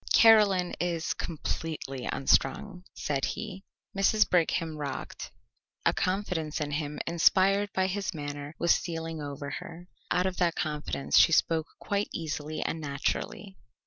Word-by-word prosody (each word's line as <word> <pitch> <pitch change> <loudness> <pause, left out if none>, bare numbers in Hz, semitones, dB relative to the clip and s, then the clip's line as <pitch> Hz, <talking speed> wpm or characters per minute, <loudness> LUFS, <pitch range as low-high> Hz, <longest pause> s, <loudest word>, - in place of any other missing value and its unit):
"Caroline 205 -5 +6
is 170 -2 -1
completely 155 -5 -4
unstrung," 180 +8 +1
said 140 -2 -2
he. 190 +1 -4 0.3
Mrs. 210 +2 +4
Brigham 165 -2 +1
rocked. 145 -2 -5 0.6
A - - +4
confidence 185 -5 -1
in 150 -1 -2
him 145 0 -3
inspired 190 +4 +3
by 190 - +2
his 190 +1 -2
manner 145 -2 -6
was 170 - +4
stealing 165 -2 -3
over 140 0 -5
her. 170 +2 -10 0.2
Out 180 +1 +2
of 185 -1 -1
that 175 -2 +2
confidence 150 -2 +1
she - - +6
spoke 160 0 +2
quite 200 0 -1
easily 155 -1 -3
and 160 - -3
naturally. 150 +7 -3
165 Hz, 135 wpm, -29 LUFS, 150-185 Hz, 0.6 s, Caroline